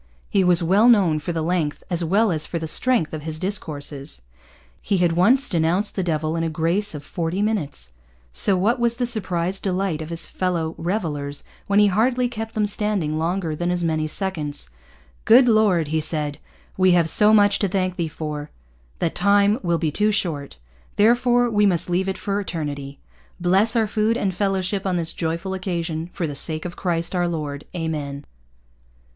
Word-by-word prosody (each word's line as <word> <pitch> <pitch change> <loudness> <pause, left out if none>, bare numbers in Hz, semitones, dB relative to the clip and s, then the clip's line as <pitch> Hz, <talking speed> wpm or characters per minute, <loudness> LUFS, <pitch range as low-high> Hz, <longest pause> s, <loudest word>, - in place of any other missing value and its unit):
He 195 - +3
was 180 -1 +5
well 200 +8 +4
known 185 -10 +4
for 150 - -4
the 165 -1 -2
length, 165 -3 -1
as 175 -1 0
well 200 +5 +2
as 155 -2 -1
for 170 - -3
the 160 - -4
strength, 195 0 +1
of 155 - -4
his 155 +1 -4
discourses. 150 - -4 0.6
He 200 - 0
had 175 -2 +2
once 220 +11 +4
denounced 175 +4 0
the 195 - 0
Devil 160 -2 -1
in 165 - -1
a 165 - -1
grace 170 +5 -1
of 145 - -7
forty 170 +3 -3
minutes. 155 - -2 0.4
So 190 - +2
what 225 +7 +1
was 235 -1 +2
the 245 +1 -1
surprised 190 -5 -1
delight 185 -4 -1
of 155 - -7
his 170 0 -3
fellow 170 -3 -2
revellers 155 -6 -3 0.2
when 200 - +1
he 210 - +6
hardly 240 +6 +2
kept 225 -2 -6
them 215 -1 +1
standing 200 -7 -1
longer 170 0 -1
than 175 +3 -2
as 175 -1 0
many 155 -2 0
seconds. 150 - -3 0.5
'Good 245 +3 +6
Lord!' 205 -9 +3
he 160 0 0
said, 150 -2 -2 0.4
'we 185 -1 +4
have 170 -2 +3
so 210 +5 +5
much 205 -2 +4
to 200 - +1
thank 185 -1 -1
Thee 170 -3 -2
for, 150 -1 -6 0.5
that 165 - -1
Time 200 +3 +3
will 170 -2 0
be 160 -2 -1
too 210 +7 +1
short. 150 - -3 0.4
Therefore 245 +3 +3
we 210 -3 +3
must 180 -1 +1
leave 190 +2 0
it 190 - -3
for 200 0 -2
Eternity. 145 -6 -5 0.4
Bless 190 +6 +2
our 225 -1 +3
food 220 +2 0
and 195 -5 -1
fellowship 195 0 -1
on 185 - 0
this 165 -2 -1
joyful 170 +3 -3
occasion, 170 -3 -3
for 180 - -3
the 150 - -4
sake 155 +3 +1
of 175 - -6
Christ 170 -1 -1
our 175 -1 +1
Lord. 150 -4 -4
Amen!' 150 -4 -4
180 Hz, 185 wpm, -22 LUFS, 160-205 Hz, 0.6 s, he